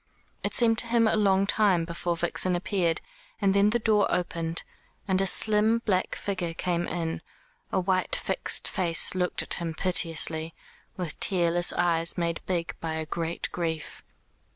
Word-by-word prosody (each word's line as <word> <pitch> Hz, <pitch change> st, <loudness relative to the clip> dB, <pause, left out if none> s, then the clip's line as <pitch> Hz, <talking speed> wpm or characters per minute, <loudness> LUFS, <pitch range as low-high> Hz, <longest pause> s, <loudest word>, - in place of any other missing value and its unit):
It -, -, -1 dB
seemed 225 Hz, -2 st, +4 dB
to 235 Hz, -, +2 dB
him 230 Hz, -1 st, +3 dB
a -, -, +2 dB
long 195 Hz, -2 st, +3 dB
time 200 Hz, -5 st, +2 dB
before 170 Hz, 0 st, -3 dB
Vixen 175 Hz, +2 st, +1 dB
appeared, 175 Hz, -2 st, -1 dB, 0.4 s
and 195 Hz, -2 st, +2 dB
then 200 Hz, +1 st, +4 dB
the 235 Hz, -, +2 dB
door 215 Hz, -3 st, +2 dB
opened, 170 Hz, -2 st, -2 dB, 0.4 s
and 190 Hz, -1 st, +2 dB
a 195 Hz, -, +2 dB
slim 220 Hz, +3 st, +3 dB
black 185 Hz, -3 st, 0 dB
figure 180 Hz, -4 st, -4 dB
came 175 Hz, 0 st, -1 dB
in, 165 Hz, -1 st, -3 dB, 0.5 s
a -, -, +1 dB
white 185 Hz, 0 st, 0 dB
fixed -, -, +1 dB
face 170 Hz, -4 st, +2 dB
looked 180 Hz, -1 st, 0 dB
at -, -, +1 dB
him 165 Hz, -2 st, -4 dB
piteously, 165 Hz, -2 st, 0 dB, 0.4 s
with 180 Hz, -4 st, -5 dB
tearless 175 Hz, -2 st, +2 dB
eyes 170 Hz, -1 st, +1 dB
made 170 Hz, -1 st, -2 dB
big 170 Hz, -3 st, -2 dB
by 160 Hz, -1 st, -4 dB
a 160 Hz, 0 st, -3 dB
great 165 Hz, +1 st, -3 dB
grief. 160 Hz, -3 st, -4 dB
175 Hz, 160 wpm, -27 LUFS, 165-195 Hz, 0.5 s, seemed